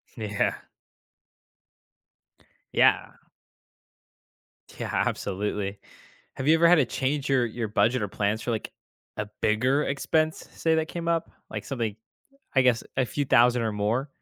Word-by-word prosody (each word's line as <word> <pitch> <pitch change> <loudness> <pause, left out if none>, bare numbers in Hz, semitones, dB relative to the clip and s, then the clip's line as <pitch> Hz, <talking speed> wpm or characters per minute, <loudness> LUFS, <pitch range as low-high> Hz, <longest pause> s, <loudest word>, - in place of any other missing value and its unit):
Yeah. 105 -2 -1 2.2
Yeah. - - +3 1.7
Yeah, - - -3
absolutely. 100 0 -2 0.6
Have 130 - -4
you 155 - +7
ever 170 +1 +5
had 175 - +7
to 150 -6 +3
change 135 +4 -2
your 130 -3 +3
your 115 0 -3
budget 115 +3 +2
or 105 - -1
plans 105 +2 -1
for, 120 - -2
like, 110 - -3 0.5
a 105 - -3
bigger 130 +7 +2
expense, 155 +3 0
say, 160 -1 +1
that 160 0 0
came 170 -1 -5
up, 165 -1 0 0.2
like - - -5
something, 115 -6 -3 0.6
I 135 - +5
guess, 125 -2 +2
a 130 - +3
few 145 +4 -2
thousand 125 -2 +4
or 110 -1 -1
more? 110 +7 -1
125 Hz, 140 wpm, -26 LUFS, 110-145 Hz, 2.2 s, you